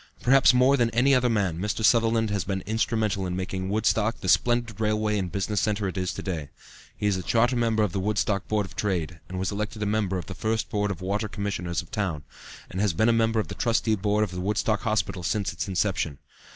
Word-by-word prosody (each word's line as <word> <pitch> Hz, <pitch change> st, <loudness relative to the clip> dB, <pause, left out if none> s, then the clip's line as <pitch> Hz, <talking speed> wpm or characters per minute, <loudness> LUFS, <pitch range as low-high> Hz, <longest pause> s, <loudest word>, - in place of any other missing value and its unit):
Perhaps 135 Hz, +1 st, +6 dB
more 130 Hz, +2 st, +4 dB
than 120 Hz, -2 st, +2 dB
any 135 Hz, +4 st, +4 dB
other 125 Hz, -2 st, +3 dB
man, 100 Hz, -7 st, 0 dB
Mr. 105 Hz, +3 st, -1 dB
Sutherland 115 Hz, -1 st, +3 dB
has 100 Hz, -2 st, 0 dB
been 95 Hz, -1 st, -3 dB
instrumental 110 Hz, -2 st, 0 dB
in 90 Hz, -, -3 dB
making 95 Hz, 0 st, -3 dB
Woodstock 110 Hz, +1 st, +1 dB
the -, -, -3 dB
splendid 120 Hz, -3 st, +2 dB
railway 105 Hz, 0 st, +1 dB
and 90 Hz, -3 st, -3 dB
business 100 Hz, +1 st, -1 dB
centre 105 Hz, -1 st, 0 dB
it 95 Hz, -, -4 dB
is 95 Hz, -1 st, -1 dB
to -, -, -6 dB
day. 80 Hz, -7 st, -4 dB, 0.5 s
He 105 Hz, -, -3 dB
is 100 Hz, -2 st, +2 dB
a -, -, -3 dB
charter 120 Hz, +6 st, +2 dB
member 115 Hz, -2 st, +2 dB
of 105 Hz, -, 0 dB
the 95 Hz, -, -2 dB
Woodstock 105 Hz, 0 st, 0 dB
Board 105 Hz, -2 st, 0 dB
of -, -, -13 dB
Trade, 85 Hz, -5 st, -2 dB
and 95 Hz, -, -5 dB
was 95 Hz, +1 st, -1 dB
elected 105 Hz, +1 st, -3 dB
a -, -, 0 dB
member 100 Hz, -2 st, 0 dB
of 90 Hz, -, -5 dB
the 95 Hz, -, -7 dB
first 110 Hz, +5 st, -2 dB
Board 105 Hz, -2 st, 0 dB
of 95 Hz, -2 st, -5 dB
Water 100 Hz, +4 st, -1 dB
Commissioners 95 Hz, -5 st, -3 dB
of -, -, -20 dB
the -, -, -5 dB
town, 90 Hz, -9 st, -2 dB, 0.5 s
and 95 Hz, -, -2 dB
has 105 Hz, -5 st, +2 dB
been 110 Hz, +8 st, +3 dB
a -, -, +4 dB
member 115 Hz, 0 st, +2 dB
of 110 Hz, -, -1 dB
the -, -, -4 dB
Trustee 115 Hz, -2 st, +1 dB
Board 105 Hz, +1 st, +1 dB
of 105 Hz, -, -3 dB
the 90 Hz, 0 st, -4 dB
Woodstock 105 Hz, +2 st, 0 dB
Hospital 110 Hz, -5 st, -1 dB
since 100 Hz, +3 st, -1 dB
its -, -, -4 dB
inception. 90 Hz, -6 st, -1 dB
105 Hz, 240 wpm, -26 LUFS, 95-110 Hz, 0.5 s, Perhaps